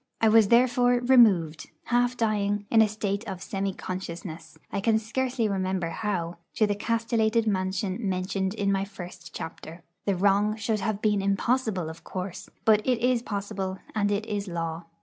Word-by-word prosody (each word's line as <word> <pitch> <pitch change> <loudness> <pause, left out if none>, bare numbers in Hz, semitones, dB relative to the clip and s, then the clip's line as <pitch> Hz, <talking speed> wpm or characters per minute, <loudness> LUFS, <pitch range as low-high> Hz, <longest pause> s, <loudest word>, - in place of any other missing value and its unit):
I 225 - +4
was 220 -1 +6
therefore 245 +1 +4
'removed,' 225 -11 +4
half 245 +1 +1
dying, 205 -2 0
in 225 - +6
a 220 - +5
state 205 -1 -2
of 190 -2 -5
semi 195 0 -2
consciousness, 175 -3 -7
I 200 - -2
can 220 +1 +3
scarcely 240 +1 -1
remember 185 -3 -1
how, 175 -3 -2 0.2
to 215 - +4
the 205 - 0
castellated 230 +1 +1
mansion 190 -1 -1
mentioned 190 +1 -1
in 200 -2 0
my 195 0 +1
first 180 -4 -9
chapter. 165 +1 -8 0.2
The 200 - +1
wrong 200 +3 +3
should 220 0 -1
have 215 -1 -2
been 210 -2 +2
impossible, 200 -1 0
of 160 +1 -9
course; 185 -1 -6 0.2
but 215 -2 +5
it 250 0 +2
is 245 0 +2
possible, 200 -3 -4 0.2
and 205 -1 +1
it 205 +1 -1
is 205 -1 -3
law. 165 -1 -4
205 Hz, 170 wpm, -27 LUFS, 185-225 Hz, 0.2 s, was